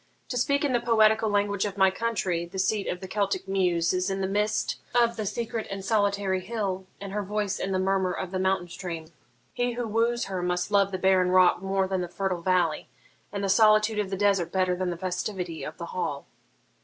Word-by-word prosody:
To 250 Hz, -, -2 dB
speak 280 Hz, +4 st, +1 dB
in 275 Hz, -, 0 dB
the 240 Hz, -, +3 dB
poetical 220 Hz, -2 st, +3 dB
language 205 Hz, -1 st, +1 dB
of 205 Hz, -1 st, -3 dB
my 190 Hz, -1 st, +5 dB
country, 190 Hz, -5 st, -1 dB
the 190 Hz, +3 st, -9 dB
seat 200 Hz, +2 st, 0 dB
of 180 Hz, -, -3 dB
the 190 Hz, -, -6 dB
Celtic 200 Hz, -1 st, -1 dB
Muse 180 Hz, -3 st, +1 dB
is 185 Hz, +1 st, 0 dB
in 195 Hz, 0 st, -2 dB
the 190 Hz, -, 0 dB
mist 210 Hz, +2 st, 0 dB, 0.2 s
of 235 Hz, -1 st, +4 dB
the 215 Hz, -2 st, -3 dB
secret 230 Hz, +1 st, -3 dB
and 195 Hz, -1 st, -5 dB
solitary 200 Hz, -2 st, +1 dB
hill, 190 Hz, -2 st, -3 dB
and 200 Hz, -1 st, -7 dB
her 210 Hz, -, -1 dB
voice 205 Hz, 0 st, -2 dB
in 195 Hz, -, -2 dB
the 190 Hz, -, +1 dB
murmur 190 Hz, 0 st, +1 dB
of 180 Hz, 0 st, -4 dB
the 185 Hz, -, -2 dB
mountain 190 Hz, -1 st, +1 dB
stream. 170 Hz, -2 st, -6 dB, 0.4 s
He 245 Hz, 0 st, -1 dB
who 240 Hz, -1 st, -3 dB
woos 230 Hz, +2 st, +1 dB
her 190 Hz, -2 st, -3 dB
must 180 Hz, +2 st, -1 dB
love 200 Hz, -1 st, +3 dB
the 185 Hz, -, -2 dB
barren 185 Hz, -1 st, +3 dB
rock 185 Hz, -1 st, +5 dB
more 195 Hz, 0 st, 0 dB
than 190 Hz, -1 st, -1 dB
the 175 Hz, -, -3 dB
fertile 185 Hz, 0 st, -2 dB
valley, 175 Hz, -3 st, +1 dB, 0.4 s
and 200 Hz, 0 st, -4 dB
the -, -, +1 dB
solitude 215 Hz, +1 st, +4 dB
of 205 Hz, -2 st, -1 dB
the 195 Hz, -, -3 dB
desert 195 Hz, -3 st, +2 dB
better 185 Hz, -1 st, +1 dB
than 185 Hz, 0 st, -2 dB
the 175 Hz, -, -3 dB
festivity 180 Hz, -2 st, -3 dB
of 150 Hz, -, -7 dB
the 170 Hz, -, -5 dB
hall.' 145 Hz, -6 st, -3 dB
195 Hz, 220 wpm, -27 LUFS, 185-210 Hz, 0.4 s, my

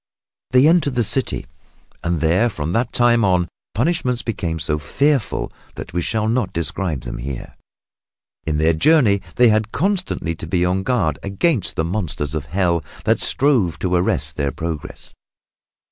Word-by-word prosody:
They 130 Hz, +2 st, +5 dB
entered 155 Hz, -5 st, +3 dB
the 120 Hz, -, +2 dB
city 130 Hz, +5 st, -1 dB, 0.6 s
and 85 Hz, -2 st, -1 dB
there 85 Hz, +8 st, +3 dB
and 120 Hz, -, 0 dB
from 80 Hz, -3 st, -3 dB
that 115 Hz, +5 st, 0 dB
time 120 Hz, -1 st, +3 dB
on 90 Hz, -2 st, +3 dB
the 90 Hz, -, -3 dB, 0.3 s
punishments 125 Hz, -1 st, 0 dB
became 85 Hz, -8 st, -2 dB
so 75 Hz, -1 st, -1 dB
fearful 140 Hz, -, 0 dB, 0.2 s
that -, -, -8 dB
we 90 Hz, -, 0 dB
shall 110 Hz, +4 st, 0 dB
not 115 Hz, -4 st, 0 dB
describe 85 Hz, -3 st, -2 dB
them -, -, -6 dB
here. 65 Hz, 0 st, -6 dB, 0.9 s
In 75 Hz, -1 st, 0 dB
their 80 Hz, +2 st, +3 dB
journey 105 Hz, -, +4 dB
they 125 Hz, -1 st, +6 dB
had 110 Hz, 0 st, +1 dB
constantly 185 Hz, -, -1 dB
to 80 Hz, -, -7 dB
be 90 Hz, +1 st, +1 dB
on 90 Hz, +1 st, +1 dB
their 95 Hz, -, -3 dB
guard 95 Hz, -, 0 dB
against 105 Hz, -, 0 dB
the 80 Hz, -, 0 dB
monsters 80 Hz, -6 st, -3 dB
of 75 Hz, -3 st, -3 dB
Hell 85 Hz, -1 st, 0 dB, 0.2 s
that -, -, +2 dB
strove 125 Hz, -, +2 dB
to 90 Hz, -1 st, -2 dB
arrest 90 Hz, +1 st, +1 dB
their 70 Hz, -1 st, 0 dB
progress. 80 Hz, -4 st, -5 dB
95 Hz, 170 wpm, -20 LUFS, 80-120 Hz, 0.9 s, they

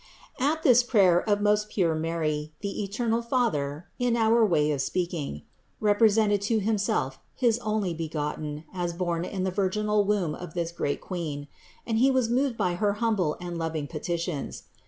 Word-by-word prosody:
54. 275 Hz, +4 st, +3 dB
At 320 Hz, -, -7 dB
this 250 Hz, -5 st, +7 dB
prayer 195 Hz, -6 st, +3 dB
of 205 Hz, 0 st, +2 dB
most 210 Hz, 0 st, +2 dB
pure 175 Hz, -6 st, +1 dB
Mary, 155 Hz, -1 st, -2 dB
the 200 Hz, 0 st, -3 dB
eternal 225 Hz, +3 st, -1 dB
Father 175 Hz, -, -1 dB
(in 245 Hz, -1 st, +2 dB
our 225 Hz, +1 st, +4 dB
way 155 Hz, -7 st, +3 dB
of 140 Hz, -2 st, 0 dB
speaking) 165 Hz, -, -3 dB, 0.4 s
represented 210 Hz, -1 st, +3 dB
to 220 Hz, +2 st, +1 dB
Himself 195 Hz, -11 st, 0 dB, 0.2 s
his 240 Hz, -3 st, +2 dB
Onlybegotten 160 Hz, -8 st, -3 dB
as 175 Hz, -2 st, -2 dB
borne 170 Hz, -1 st, -1 dB
in 190 Hz, -1 st, -3 dB
the 190 Hz, -, 0 dB
virginal 210 Hz, +2 st, +1 dB
womb 195 Hz, -6 st, 0 dB
of 175 Hz, -1 st, -8 dB
this 170 Hz, -1 st, -1 dB
great 145 Hz, -4 st, -2 dB
Queen; 155 Hz, -6 st, -5 dB, 0.4 s
and 225 Hz, -1 st, 0 dB
He 265 Hz, +3 st, +5 dB
was 260 Hz, -3 st, +2 dB
moved 255 Hz, -1 st, +1 dB
by 180 Hz, -, +1 dB
her 205 Hz, -1 st, +3 dB
humble 205 Hz, -7 st, 0 dB
and 175 Hz, -1 st, -5 dB
loving 160 Hz, -2 st, -2 dB
petitions. 165 Hz, 0 st, -4 dB
190 Hz, 165 wpm, -27 LUFS, 165-220 Hz, 0.4 s, this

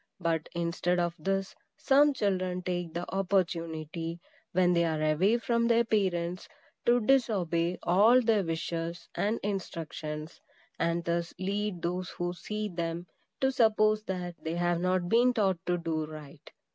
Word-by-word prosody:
But 165 Hz, -3 st, -1 dB
instead 170 Hz, +1 st, 0 dB
of 175 Hz, -1 st, 0 dB
this, 195 Hz, +3 st, -1 dB, 0.2 s
some 290 Hz, +2 st, +5 dB
children 185 Hz, -4 st, -1 dB
take 175 Hz, -2 st, -3 dB
the 175 Hz, +1 st, -2 dB
opportunity, 170 Hz, -3 st, -1 dB, 0.3 s
when 180 Hz, 0 st, +3 dB
they 170 Hz, 0 st, +3 dB
are 160 Hz, -2 st, 0 dB
away 155 Hz, +9 st, +3 dB
from 235 Hz, 0 st, +1 dB
their 235 Hz, 0 st, +4 dB
parents, 185 Hz, -5 st, -1 dB, 0.4 s
to 240 Hz, +1 st, +5 dB
disobey 185 Hz, -9 st, +2 dB
all 210 Hz, +8 st, +6 dB
their 225 Hz, -4 st, +2 dB
wishes 165 Hz, 0 st, -3 dB
and 215 Hz, +3 st, 0 dB
instructions, 160 Hz, -5 st, -5 dB, 0.4 s
and 170 Hz, +1 st, 0 dB
thus 170 Hz, 0 st, -1 dB
lead 195 Hz, -1 st, -2 dB
those 180 Hz, +1 st, -2 dB
who 175 Hz, 0 st, -3 dB
see 210 Hz, +4 st, -4 dB
them 170 Hz, -2 st, -3 dB, 0.4 s
to 265 Hz, 0 st, +3 dB
suppose 215 Hz, -3 st, +3 dB
that 180 Hz, -2 st, -4 dB
they 160 Hz, +1 st, -2 dB
have 175 Hz, 0 st, +1 dB
not 185 Hz, -1 st, +1 dB
been 240 Hz, +4 st, +4 dB
taught 190 Hz, -6 st, +1 dB
to 180 Hz, 0 st, +2 dB
do 160 Hz, -2 st, -2 dB
right. 155 Hz, -2 st, -11 dB
180 Hz, 145 wpm, -29 LUFS, 170-205 Hz, 0.4 s, all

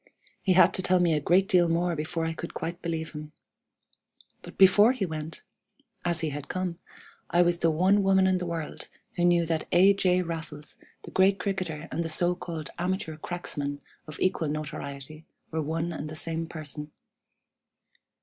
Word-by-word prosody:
He 190 Hz, -, +3 dB
had 185 Hz, -, +6 dB
to -, -, 0 dB
tell 185 Hz, 0 st, +3 dB
me 175 Hz, -2 st, +3 dB
a 150 Hz, -, +2 dB
great 180 Hz, +6 st, +3 dB
deal 175 Hz, -3 st, +4 dB
more 170 Hz, +1 st, +1 dB
before 160 Hz, +2 st, -2 dB
I 165 Hz, -, -1 dB
could 170 Hz, +1 st, -7 dB
quite 170 Hz, +2 st, -4 dB
believe 160 Hz, -2 st, -3 dB
him. 150 Hz, -1 st, -8 dB, 1.1 s
But -, -, -12 dB
before 205 Hz, +5 st, +7 dB
he 220 Hz, -7 st, -1 dB
went 160 Hz, -1 st, -6 dB, 0.6 s
(as 175 Hz, -2 st, +1 dB
he 160 Hz, -, 0 dB
had 145 Hz, 0 st, -6 dB
come) 180 Hz, -2 st, -3 dB, 0.5 s
I 175 Hz, +1 st, +4 dB
was 175 Hz, 0 st, +1 dB
the 165 Hz, -, +3 dB
one 185 Hz, +6 st, +3 dB
woman 190 Hz, -1 st, +4 dB
in 185 Hz, -1 st, +2 dB
the 180 Hz, -, -3 dB
world 165 Hz, -2 st, -5 dB, 0.3 s
who 175 Hz, -, +2 dB
knew 175 Hz, -1 st, +4 dB
that 160 Hz, -1 st, -2 dB
A. 190 Hz, +3 st, +6 dB
J. 185 Hz, -2 st, +2 dB
Raffles, 160 Hz, -3 st, -6 dB, 0.2 s
the -, -, -10 dB
great 190 Hz, +1 st, +4 dB
cricketer, 185 Hz, -5 st, -3 dB
and 170 Hz, -, -1 dB
the 165 Hz, -, -4 dB
so 175 Hz, +2 st, +2 dB
called 165 Hz, -4 st, -6 dB
'amateur 180 Hz, -3 st, -2 dB
cracksman' 145 Hz, -4 st, -4 dB, 0.3 s
of 155 Hz, +1 st, -9 dB
equal 185 Hz, -3 st, +1 dB
notoriety, 150 Hz, 0 st, -5 dB, 0.3 s
were 160 Hz, 0 st, -1 dB
one 165 Hz, +3 st, -2 dB
and 155 Hz, -1 st, -5 dB
the 155 Hz, -, -7 dB
same 165 Hz, +1 st, -3 dB
person. 150 Hz, -2 st, -6 dB
170 Hz, 180 wpm, -28 LUFS, 155-180 Hz, 1.1 s, before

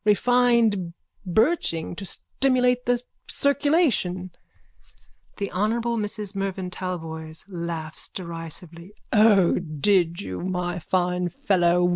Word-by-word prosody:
Refined 225 Hz, -5 st, +3 dB, 0.3 s
birching 185 Hz, -, +1 dB
to 195 Hz, -, -6 dB
stimulate 250 Hz, +3 st, +1 dB
the 245 Hz, 0 st, +3 dB, 0.3 s
circulation. 280 Hz, -, +1 dB, 1.1 s
THE 200 Hz, -, -3 dB
HONOURABLE 230 Hz, +4 st, 0 dB
MRS 210 Hz, -1 st, -2 dB
MERVYN 195 Hz, -2 st, -3 dB
TALBOYS: 160 Hz, -3 st, -5 dB
(Laughs 170 Hz, -4 st, -4 dB
derisively.) 170 Hz, +1 st, -8 dB, 0.2 s
O, 210 Hz, -4 st, +5 dB
did 170 Hz, +1 st, +1 dB
you, 95 Hz, -2 st, -5 dB
my 180 Hz, -1 st, -2 dB
fine 180 Hz, +1 st, 0 dB
fellow? 175 Hz, -1 st, +2 dB
185 Hz, 95 wpm, -24 LUFS, 170-220 Hz, 1.1 s, O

